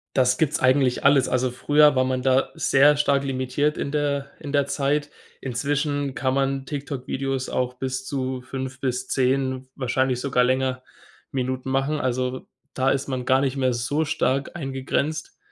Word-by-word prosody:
Das 125 -1 +3
gibt's 155 -3 +1
eigentlich 130 -1 +2
alles. 140 -1 +5
Also, 130 0 +1
früher 145 +3 +4
war 130 - +3
man 130 0 -1
da 130 0 +3
sehr 145 +2 +4
stark 140 -1 +2
limitiert 135 +3 -1
in 140 - -3
der 140 -2 -1
in 145 - -7
der 140 -1 +2
Zeit, 145 +1 -1 0.3
inzwischen 145 +2 -1
kann 130 -2 0
man 135 0 0
TikTok 140 -2 -5
Videos 135 -1 -2
auch 125 0 -2
bis 130 0 -4
zu 130 -2 -3
5 130 0 -6
bis 130 -1 -2
10, 130 0 0
wahrscheinlich 130 0 0
sogar 125 -2 +2
länger, 130 0 0 0.5
Minuten 130 0 -2
machen. 135 +3 0
Also, 130 0 -2 0.3
da 130 0 +1
ist 135 0 0
man 130 -2 -3
gar 130 +1 +4
nicht 135 0 0
mehr 130 -2 +1
so 125 +6 0
stark 140 -2 -1
eingegrenzt 140 - -3
135 Hz, 165 wpm, -24 LUFS, 130-140 Hz, 0.5 s, alles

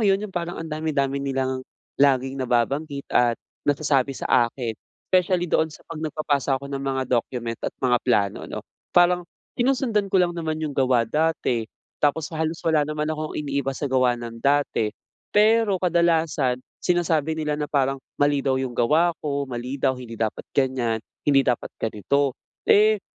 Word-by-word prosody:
iyun, 200 -1 +2
iyung 195 - -8
parang, 175 0 -3
ang 165 - -5
dami-dami 140 -3 -1
nilang 130 -1 -1 0.4
laging 135 -1 +3
nababanggit 140 +4 0
at 120 -1 +3 0.3
nasasabi 140 -2 +1
sa - - -5 0.2
akin. 120 -2 -4 0.4
Specially 180 -1 +3
doon 160 -2 +1
sa 150 - -14
kapag 165 -2 -8
nagpapasa 145 -3 0
ako 140 - -8
ng 135 - -2
mga 135 -1 -1
document 120 -1 -1
at - - -3
mga 125 -2 +2
plano 100 -6 +2
ano. - - -5 0.4
Parang, 175 0 +4 0.3
sinusundan 240 -5 +1
ko 190 - +1
lang 175 -1 +2
naman 160 -2 -3
iyung 155 -2 -2
gawa 130 -3 +3
dati. 125 -4 0 0.3
Tapos, 150 +2 +1
halos 160 +1 -1
wala 155 -2 +2
naman 150 0 -2
akong 155 0 -4
iniiba 140 -2 -2
sa - - -4
gawa 130 -2 +2
ng 115 -1 -8
dati. 140 -5 +2 0.4
Pero, 215 -1 +4
kadalasan 165 -7 +2 0.3
sinasabi 165 -3 +1
nila 150 -2 -1
na 150 - -2
parang, 135 -1 +1 0.2
mali 145 -1 +2
daw 130 -1 +1
iyung 125 -2 -4
gawa 160 +8 +3
ko, 140 -2 -1
mali 125 +2 -4
daw. 130 -1 +2
"Hindi 115 -3 -9
dapat 110 -1 -1
ganyan, 125 -4 +1 0.2
hindi 140 -2 +5
dapat 125 -2 -1
ganito." 125 +6 0 0.3
eh, 215 0 +5
140 Hz, 165 wpm, -24 LUFS, 130-160 Hz, 0.4 s, hindi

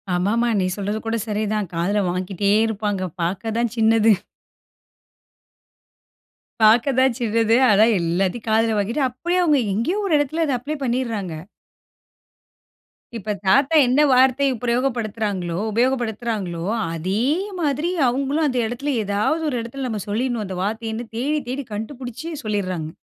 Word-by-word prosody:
ஆமாமா. 225 +7 +1
நீ 185 - +1
சொல்றது 205 +2 -2
கூட 225 +1 -1
சரிதான் 210 -2 -1
காதுல 195 +5 0
வாங்கிட்டே 185 +2 -1 0.2
இருப்பாங்க. 205 -3 -2 0.2
பாக்க 190 +6 -2
தான் 235 -1 0
சின்னது. 225 0 +5 2.5
பாக்க 230 +5 +5
தான் 260 -2 +3
சின்னது. 230 -1 +2
ஆனா 210 +1 +6
எல்லாத்தையும் 185 +7 -1
காதுல 225 0 +2
வாங்கிட்டு 235 +8 0
அப்டியே 345 +9 -1
அவங்க 300 -4 +3
எங்கேயோ 295 - 0
ஒரு 345 - 0
இடத்துல 310 +3 0
அத 280 - 0
அப்ளே 290 +5 -4
பண்ணிட்றாங்க. 230 -8 -2 1.8
இப்ப 210 -1 -3
தாத்தா 275 +11 +4
என்ன 255 +4 +3
வார்த்தை 260 +2 +4 0.2
பிரயோக 245 +2 +1
படுத்துறாங்களோ 205 -6 -3 0.2
உபயோகப்படுத்துறாங்களோ 220 -7 -1 0.3
அதே 190 +7 -1 0.4
மாதிரி 300 +2 0 0.2
அவங்களும் 275 +5 0
அந்த 255 -3 0
இடத்துல 255 +5 -2
ஏதாவது 210 +11 0
ஒரு 250 - -2
இடத்துல 255 +3 -5
நம்ம 215 -3 -3
சொல்லிடணும். 230 +1 -1
அந்த 190 -1 -6
வார்த்தையன்னு 225 +2 -3
தேடி, 290 +6 0
தேடி 275 +2 -3
கண்டுபுடிச்சி 245 +6 -6 0.2
சொல்லிட்றாங்க. 185 -7 -2
225 Hz, 130 wpm, -22 LUFS, 205-255 Hz, 2.5 s, ஆனா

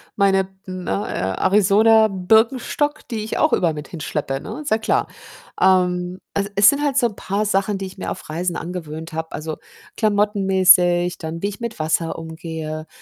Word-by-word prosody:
meine, 195 -1 +3
b 190 0 -24
ne, 185 -1 -6
A 95 - -2
Arizona 215 +3 +5
Birkenstock, 225 +9 +1
die 220 -4 -3
ich 220 - -4
auch 310 - +3
überall 170 -3 +2
mit 150 -1 -7
hinschleppe, 150 -4 -3
ne, - - -7
ist 295 - -6
ja 220 - +4
klar. 220 - 0 0.5
Ähm, 180 -1 +2
also 200 0 -1
es 200 +1 +7
sind 285 0 0
halt 280 -2 0
so 245 -3 +4
'n 210 - -10
paar 200 +2 -2
Sachen, 195 0 0
die 195 - -5
ich 190 - -10
mir - - -4
auf - - -8
Reisen 170 +3 -2
angewöhnt 165 -2 -6
habe. 160 0 -4
Also, 155 +1 -5 0.4
klamottenmäßig, 190 -4 +3
dann 165 0 -6
wie 200 - +1
ich 200 - -9
mit 235 -1 -5
Wasser 160 +1 -1
umgehe, 160 -1 -6
190 Hz, 185 wpm, -21 LUFS, 165-210 Hz, 0.5 s, es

